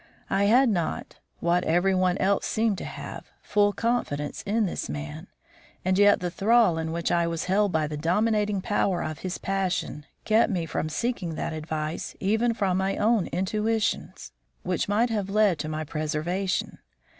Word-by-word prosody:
I 195 +1 +3
had 250 +6 +5
not, 175 -8 -2 0.2
what 175 +1 +2
every 175 +4 +2
one 185 0 +2
else 195 +1 +1
seemed 220 -3 0
to - - -6
have, - - -8
full 205 -1 +3
confidence 200 -11 -2
in 215 +2 +2
this 185 - -4
man, 75 0 -6 0.6
and 185 0 +2
yet 205 0 +5
the 180 -1 -2
thrall 215 -4 +3
in 160 0 -3
which 170 0 -1
I 170 -1 +2
was 165 -1 -2
held 200 +2 +2
by 160 -2 +1
the 150 0 -4
dominating 210 +4 +1
power 195 -2 0
of 155 -2 -5
his 185 -1 -4
passion, 185 -6 -2 0.2
kept 220 +1 +3
me 175 -4 -1
from 155 -1 -3
seeking 185 -4 -2
that - - -3
advice 155 0 -4
even 225 +4 +1
from 190 -4 +1
my 190 +1 0
own 220 -2 +2
intuitions, 210 - -1 0.3
which - - -1
might 225 +4 +2
have 205 -3 -1
led 200 -5 +3
to 155 - -3
my 155 0 -3
preservation. 155 +5 -2
190 Hz, 170 wpm, -26 LUFS, 165-210 Hz, 0.6 s, had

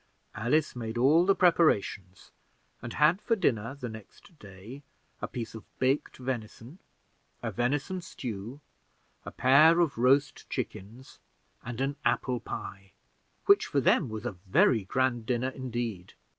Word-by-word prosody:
Alice 130 +9 0
made 115 -1 -5
all 155 +8 +4
the 195 - +5
preparations, 100 - +1 0.5
and 120 -1 -7
had 160 +6 +3
for 230 - +1
dinner 115 - 0
the 125 -3 -6
next 110 - -13
day 100 +7 -11 0.4
a - - -2
piece 115 -3 -6
of 110 -2 -9
baked 130 +3 0
venison, 125 - -6 0.6
a - - -2
venison 145 +9 -1
stew, 120 - -7 0.7
a - - -6
pair 155 +7 +5
of 155 -8 +1
roast 135 +2 +2
chickens, 115 +7 -7 0.4
and 120 0 -6
an 140 +1 -1
apple 125 -2 0
pie 95 -2 -8 0.5
which, 400 0 +5
for 140 - +1
them, 130 - +2
was 110 -1 -6
a - - -1 0.2
very 100 +2 +3
grand 120 +1 0
dinner 125 +1 0
indeed. 120 -8 -5
125 Hz, 140 wpm, -29 LUFS, 110-145 Hz, 0.7 s, the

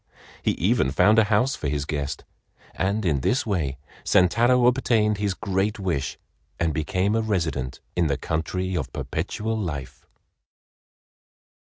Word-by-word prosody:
He - - +1
even 65 - +2
found 105 +10 +4
a 110 - +5
house 110 +6 +2
for 75 - -3
his 70 0 -1
guest, 70 -2 -3 0.5
and 100 +2 -1
in 75 -6 +2
this 125 - +1
way 80 -11 -1 0.3
Sentaro 120 +7 +4
obtained 115 -5 +2
his 100 -3 0
great 100 0 -1
wish 85 -9 -2 0.4
and 80 -2 +1
became 90 +7 0
a 115 - +2
resident 80 - -2
in 85 -2 +2
the 70 -1 0
country 90 +5 -2
of - - -3
Perpetual 110 +1 -3
Life. 75 -11 -5
95 Hz, 140 wpm, -24 LUFS, 75-110 Hz, 0.5 s, a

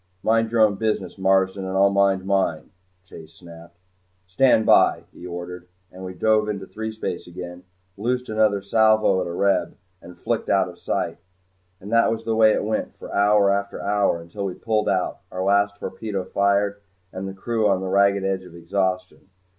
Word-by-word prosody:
"Mind 115 0 +2
your 115 -1 +2
own 105 -2 +4
business, 105 -4 -2
Marsden 95 0 +2
and 95 0 -3
I'll 100 +1 +4
mind 100 -1 +2
mine," 95 -5 -1 0.3
Chase 80 -3 -13
snapped. 85 0 -14 0.5
"Stand 110 +3 +3
by," - - +4
he 90 - -10
ordered, 90 0 -7 0.2
and 95 +1 -11
we 95 0 -7
dove 110 +3 +2
into 100 -2 -4
threespace 110 -4 -5
again 90 +1 -9 0.3
loosed 125 +4 -2
another 110 -2 +1
salvo 110 -1 +3
at 90 - -2
another 85 - -5
Reb, 100 +1 0 0.2
and 90 +1 -13
flicked - - -3
out - - +3
of - - -12
sight. - - -3 0.6
And 100 +3 -10
that 115 0 +4
was 115 0 -3
the 115 -1 0
way 110 -1 +5
it - - 0
went 110 0 -3
for - - -10
hour 100 0 +4
after 100 0 -2
hour 100 -4 +1
until 85 +5 -7
we 95 -2 -4
pulled 110 -2 -1
out, 95 -2 -1
our 95 0 -3
last 100 +1 +2
torpedo 100 -2 -5
fired 100 +1 0 0.3
and 95 +1 -5
the 95 - -7
crew 110 +2 0
on 95 -2 +2
the 95 - -4
ragged 100 +1 +3
edge 95 -1 -1
of 90 -2 -14
exhaustion. 95 +2 -3
100 Hz, 185 wpm, -23 LUFS, 95-105 Hz, 0.6 s, way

